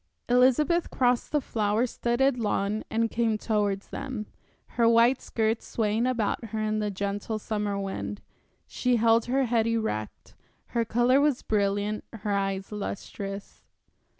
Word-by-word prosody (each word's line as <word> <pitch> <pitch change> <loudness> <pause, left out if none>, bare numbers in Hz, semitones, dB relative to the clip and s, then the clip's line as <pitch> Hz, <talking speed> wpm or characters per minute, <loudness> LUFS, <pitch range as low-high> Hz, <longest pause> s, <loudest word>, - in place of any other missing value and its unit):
Elizabeth 265 +7 +3
crossed 245 -1 +1
the 300 - +3
flower 220 -2 0
studded 245 +2 +1
lawn 210 -1 0
and 225 0 0
came 225 -2 +1
towards 205 -3 -1
them, 255 -6 -5 0.4
her 235 -1 +3
white 235 +3 +4
skirts 225 0 -1
swaying 220 +2 0
about 235 -3 -1
her 220 0 -4
in 215 0 0
the 210 -1 -1
gentle 200 +2 -3
summer 210 -1 -2
wind. 195 +1 -4 0.5
She 250 -1 0
held 230 0 +4
her 265 +2 +1
head 230 -2 +1
erect, 220 - -3 0.4
her 235 -1 0
color 240 +4 +3
was 290 -3 +1
brilliant, 205 0 0
her 210 -2 -4
eyes 195 0 -1
lustrous. 200 -1 -6
220 Hz, 140 wpm, -27 LUFS, 205-240 Hz, 0.5 s, white